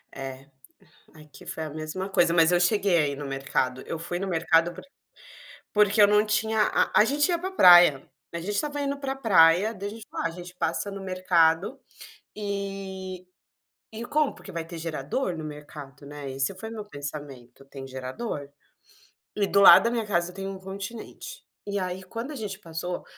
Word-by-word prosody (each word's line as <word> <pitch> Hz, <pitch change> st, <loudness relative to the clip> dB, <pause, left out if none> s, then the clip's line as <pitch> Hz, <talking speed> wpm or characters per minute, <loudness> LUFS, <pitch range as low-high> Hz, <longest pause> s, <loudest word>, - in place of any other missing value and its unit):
É, 135 Hz, 0 st, -7 dB, 0.7 s
aqui 150 Hz, -3 st, -15 dB
foi 160 Hz, -, -5 dB
a 155 Hz, -, -6 dB
mesma 155 Hz, +5 st, -5 dB
coisa, 175 Hz, -3 st, +3 dB
mas 165 Hz, 0 st, +5 dB
eu 175 Hz, -, +3 dB
cheguei 195 Hz, -1 st, +3 dB
a 150 Hz, -, +3 dB
ir 140 Hz, -, -4 dB
no 145 Hz, 0 st, -6 dB
mercado, 135 Hz, -1 st, -2 dB
eu 165 Hz, -, -5 dB
fui 175 Hz, +2 st, -4 dB
no 195 Hz, -, -3 dB
mercado 165 Hz, -1 st, +2 dB
por -, -, -11 dB, 0.9 s
porque 210 Hz, 0 st, +4 dB
eu -, -, +9 dB
não 210 Hz, +1 st, +4 dB
tinha 220 Hz, +1 st, +1 dB
a -, -, +2 dB
a -, -, +3 dB
gente 290 Hz, +7 st, +1 dB
ia 345 Hz, -1 st, +1 dB
para 370 Hz, +3 st, -4 dB
praia, 175 Hz, -, +7 dB, 0.3 s
a -, -, -2 dB
gente 180 Hz, +5 st, -5 dB
estava 290 Hz, +6 st, -2 dB
indo 280 Hz, 0 st, -2 dB
para 270 Hz, -1 st, -3 dB
praia, 195 Hz, -4 st, +5 dB
daí 200 Hz, 0 st, -5 dB
a -, -, -6 dB
gente 225 Hz, 0 st, -11 dB
fala: -, -, -4 dB
"Ah, -, -, -1 dB
gente 180 Hz, +1 st, -10 dB
passa 175 Hz, +4 st, -2 dB
no 195 Hz, 0 st, -7 dB
mercado, 185 Hz, +3 st, +2 dB, 0.6 s
e 195 Hz, -2 st, -5 dB, 0.7 s
e 225 Hz, +2 st, -6 dB
compra, 300 Hz, +3 st, 0 dB
porque 195 Hz, -, -11 dB
vai 165 Hz, -2 st, -4 dB
ter 170 Hz, 0 st, -9 dB
gerador 165 Hz, -, -3 dB
no 160 Hz, -, -6 dB
mercado”, 145 Hz, -2 st, -10 dB
né, 145 Hz, -1 st, -8 dB
esse 135 Hz, +7 st, -2 dB
foi 220 Hz, +4 st, -7 dB
o -, -, -8 dB
meu 215 Hz, -2 st, -7 dB
pensamento, 140 Hz, -, -9 dB
“tem 135 Hz, -1 st, -10 dB
gerador”. 135 Hz, -, -6 dB, 0.9 s
E 205 Hz, -1 st, +1 dB
do 200 Hz, -, +3 dB
lado 200 Hz, -, +10 dB
da 230 Hz, -, +2 dB
minha 230 Hz, -2 st, -2 dB
casa 175 Hz, -3 st, 0 dB
tem 195 Hz, +1 st, -6 dB
um 195 Hz, -1 st, -6 dB
Continente. 200 Hz, -, -8 dB, 0.2 s
E 200 Hz, 0 st, -1 dB
aí, 185 Hz, 0 st, -4 dB
quando 230 Hz, +8 st, -6 dB
a 300 Hz, -, -7 dB
gente 205 Hz, -5 st, -6 dB
passou, 170 Hz, +2 st, -5 dB
180 Hz, 195 wpm, -26 LUFS, 155-210 Hz, 0.9 s, lado